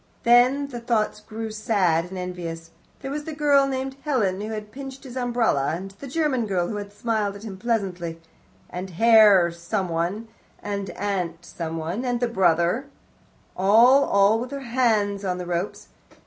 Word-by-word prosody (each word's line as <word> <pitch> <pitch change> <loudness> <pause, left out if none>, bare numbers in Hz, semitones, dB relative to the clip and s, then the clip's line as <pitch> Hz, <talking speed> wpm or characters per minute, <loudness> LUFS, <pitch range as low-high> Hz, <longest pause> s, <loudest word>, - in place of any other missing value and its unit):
Then 250 +4 +4
the 245 -3 -6
thoughts 230 -3 0
grew 220 +1 -6
sad 195 -6 +1
and 185 +1 -8
envious. 170 -2 -6 0.3
There 270 - -5
was 295 +1 -4
the 315 - -6
girl 285 -2 +4
named 265 0 -3
Helen, 205 -10 0
who 215 - -4
had 215 -1 -6
pinched 270 +1 -9
his 260 -2 -10
umbrella, 235 - +1
and 190 +3 -7
the 235 +8 -11
German 270 -5 0
girl 180 -3 0
who 210 - -3
had 205 0 -6
smiled 210 -2 -1
at 200 - -11
him 210 -4 -7
pleasantly, 190 -6 -2 0.5
and 185 +2 -6
Herr 205 -2 +6
someone, 175 +3 -2 0.4
and 200 -2 -3
Aunt 180 -4 -3
someone, 165 +6 -4
and 245 -2 -1
the 245 - +1
brother 185 +3 +2 0.7
all, 235 +9 +5
all 200 +3 +3
with 245 +2 -5
their 280 0 -6
hands 220 -5 +1
on 180 -2 -1
the 180 - -5
ropes. 175 +2 -4
210 Hz, 165 wpm, -24 LUFS, 180-245 Hz, 0.7 s, Herr